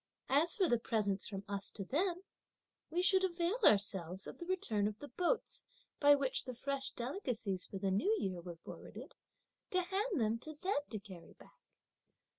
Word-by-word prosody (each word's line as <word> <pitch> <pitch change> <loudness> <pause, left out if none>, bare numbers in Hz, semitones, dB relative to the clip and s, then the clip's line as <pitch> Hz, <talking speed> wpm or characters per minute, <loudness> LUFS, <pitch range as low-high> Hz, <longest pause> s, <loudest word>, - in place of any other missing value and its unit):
As 305 +5 +4
for 380 -3 +3
the 240 -5 +3
presents 205 -4 0
from 195 -1 -5
us 200 -1 -3
to 195 - -4
them, 355 - 0 0.7
we 350 +3 0
should 380 0 +5
avail 355 +4 0
ourselves 195 - +3
of - - -8
the 345 - -7
return 220 - +1
of 210 0 -4
the 290 - -9
boats, 365 - -1 0.4
by 290 0 +8
which 275 -2 0
the 255 -2 -5
fresh 275 +2 -2
delicacies 235 - -2
for 195 - -6
the 190 0 0
new 205 - +2
year 185 - -2
were 175 0 -7
forwarded, - - -9 0.6
to 365 - +2
hand 390 - 0
them 225 0 +1
to 310 +5 -5
them 365 +2 0
to 220 - -3
carry 190 -4 -11
back." - - -19
255 Hz, 180 wpm, -36 LUFS, -, 0.7 s, by